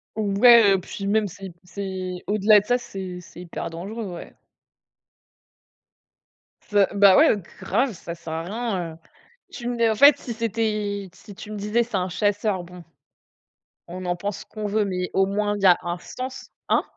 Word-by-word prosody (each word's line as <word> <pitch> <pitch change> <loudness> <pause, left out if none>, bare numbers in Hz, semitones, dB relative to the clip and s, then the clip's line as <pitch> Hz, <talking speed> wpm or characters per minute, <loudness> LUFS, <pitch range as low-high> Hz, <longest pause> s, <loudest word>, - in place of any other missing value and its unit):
Ouais, 215 0 +6
heu, - - 0
puis 200 +2 -6
même 210 0 +2
c'est 190 -1 -10
c'est 185 -1 -5
au-delà 210 +1 +5
de 205 - -9
ça, 245 +2 +2
c'est 190 -6 -7
c'est 175 - -14
hyper 170 -1 -6
dangereux, 200 +6 -6
ouais. - - -10 2.3
Ça, 205 -2 +4
bah, 200 -2 +6
ouais, 305 -7 +6 0.2
grave, 240 +3 0
ça 170 -1 -8
sert 160 -1 -8
à 165 +1 -3
rien, 195 -5 -3
heu, - - -14 0.5
tu 240 -1 -7
me 245 - -1
nai 230 -1 +3
en 220 - +1
fait 285 +6 +7
si 235 - -6
c'était, 215 -3 -2
si 205 0 -14
tu 215 - -10
me 210 - -5
disais 210 +4 +1
c'est 230 -3 -7
un 185 0 0
chasseur, 205 -1 0
bon, 180 0 -12 1.0
on 180 +1 -7
en 175 0 0
pense 200 +3 -4
ce - - -11
qu'on 215 -1 -5
veut, 210 0 +1
mais 180 -2 -3
au 195 - +3
moins, 205 +1 -1
il 205 - -6
y - - +2
a 180 -2 +7
un 175 0 -3
sens, 255 0 -8 0.2
hein? - - +3
200 Hz, 185 wpm, -24 LUFS, 185-220 Hz, 2.3 s, fait